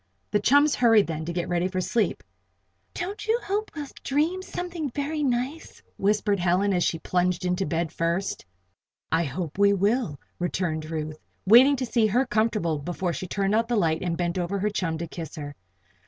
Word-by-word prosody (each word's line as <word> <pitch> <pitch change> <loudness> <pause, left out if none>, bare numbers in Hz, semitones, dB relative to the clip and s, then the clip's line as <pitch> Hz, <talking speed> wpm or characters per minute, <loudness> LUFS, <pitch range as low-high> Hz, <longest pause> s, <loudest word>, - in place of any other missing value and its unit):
The 210 - +3
chums 285 +7 +4
hurried, 225 -4 +5
then, 160 -1 -4
to 170 - -3
get 175 +1 -2
ready 175 0 +1
for 185 0 -3
sleep. 220 +4 0 0.7
"Don't 390 +5 -5
you 455 +2 +2
hope 415 +2 -2
we'll 295 -2 -4 0.2
dream 315 +7 0
something 350 -5 -4
very 290 +4 -3
nice?" 265 +4 -2 0.2
whispered 205 0 +1
Helen 185 +3 +2
as 175 -1 +2
she 165 - 0
plunged 180 +2 0
into 180 +2 0
bed 165 -1 -1
first. 170 +4 -1 0.7
"I 165 +1 +2
hope 155 +5 -5
we 200 0 +5
will," 200 - 0 0.2
returned 170 -3 -2
Ruth, 155 -1 -4 0.3
waiting 250 +8 +7
to 255 -1 -2
see 230 -2 +2
her 245 +6 +2
comfortable 215 - 0
before 175 +3 -2
she 185 +5 -5
turned 195 +2 0
out 225 +1 +2
the 240 - 0
light 165 -6 +1
and 170 -2 -2
bent 175 0 -1
over 180 +3 -1
her 210 +2 0
chum 175 -6 -1
to 170 - -4
kiss 165 -1 -7
her. 145 -2 -6
195 Hz, 185 wpm, -26 LUFS, 170-245 Hz, 0.7 s, waiting